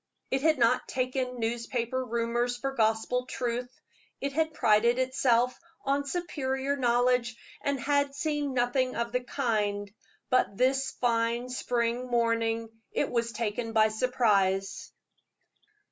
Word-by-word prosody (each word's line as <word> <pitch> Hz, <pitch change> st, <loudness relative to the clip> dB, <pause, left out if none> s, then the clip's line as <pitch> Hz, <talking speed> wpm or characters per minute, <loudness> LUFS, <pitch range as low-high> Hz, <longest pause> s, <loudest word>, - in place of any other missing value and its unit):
It 265 Hz, -, +1 dB
had 310 Hz, 0 st, +3 dB
not 240 Hz, 0 st, +3 dB
taken 255 Hz, -1 st, -2 dB
newspaper 235 Hz, +2 st, -2 dB
rumors 240 Hz, +1 st, -1 dB
for 270 Hz, +2 st, -2 dB
gospel 230 Hz, +1 st, +1 dB
truth. 245 Hz, -1 st, -3 dB, 0.5 s
It 280 Hz, 0 st, -3 dB
had 315 Hz, +2 st, +1 dB
prided 235 Hz, -2 st, +3 dB
itself 255 Hz, -1 st, +2 dB, 0.3 s
on 280 Hz, +1 st, +1 dB
superior 280 Hz, -5 st, -2 dB
knowledge, 245 Hz, -2 st, +2 dB, 0.2 s
and 280 Hz, -1 st, -1 dB
had 285 Hz, +1 st, +1 dB
seen 290 Hz, -2 st, -1 dB
nothing 255 Hz, +1 st, +1 dB
of 235 Hz, 0 st, -2 dB
the 250 Hz, +1 st, -1 dB
kind; 210 Hz, -6 st, -1 dB, 0.4 s
but 255 Hz, -6 st, +2 dB
this 265 Hz, +1 st, +2 dB
fine 235 Hz, 0 st, 0 dB
spring 245 Hz, 0 st, -1 dB
morning 230 Hz, -1 st, +1 dB, 0.2 s
it -, -, -1 dB
was 235 Hz, -1 st, 0 dB
taken 225 Hz, +1 st, -3 dB
by 220 Hz, -1 st, +5 dB
surprise. 210 Hz, -5 st, +1 dB
245 Hz, 125 wpm, -29 LUFS, 230-260 Hz, 0.5 s, by